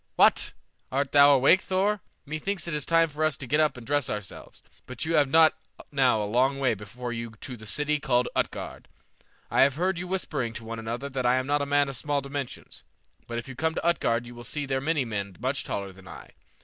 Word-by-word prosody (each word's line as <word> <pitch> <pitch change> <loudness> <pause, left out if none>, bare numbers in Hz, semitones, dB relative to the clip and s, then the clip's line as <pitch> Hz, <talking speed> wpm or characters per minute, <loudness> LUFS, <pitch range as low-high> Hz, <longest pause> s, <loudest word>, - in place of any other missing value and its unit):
What! - - +4 0.4
Art 135 +1 0
thou 145 0 +7
awake, 140 +8 +5
Thor? 195 +2 0 0.2
Me 155 +2 -4
thinks 195 0 -3
it 170 - -3
is 150 -1 -3
time 165 0 +4
for 155 0 -4
us 155 -2 +1
to 135 - -6
get 150 +5 +1
up 150 -4 +2
and 120 - -10
dress 145 0 +1
ourselves; 105 -3 -7 0.2
but 125 +3 -5
you 165 - -1
have 145 -4 +4
not 160 +2 +6 0.4
now 130 -6 +3
a - - -1
long 130 +6 +2
way 130 -3 +2
before 120 +4 -6
you 115 -1 -5
to 125 - -7
the 110 -2 -12
city 150 +6 0
called 125 -4 +1
Utgard. - - -3 0.6
I - - +4
have 135 0 +5
heard 180 +2 0
you 180 - -5
whispering 150 -10 -2
to 115 - -7
one 115 0 -5
another 115 +5 -4
that 130 -2 -1
I 125 - +4
am 130 0 0
not 145 +1 +1
a 140 - -2
man 145 0 +3
of 135 - -5
small 145 +3 -1
dimensions; 140 -1 -6 0.5
but 120 - -4
if 120 - -5
you 135 - -7
come 160 +4 -1
to - - -3
Utgard 120 -8 +1
you 120 - -10
will 120 0 -10
see 145 +5 -3
there 135 -1 -1
many 150 -2 0
men 100 -4 -4
much 130 +4 -1
taller 100 -1 -4
than 95 0 -16
I. - - -11
135 Hz, 240 wpm, -27 LUFS, 120-150 Hz, 0.6 s, thou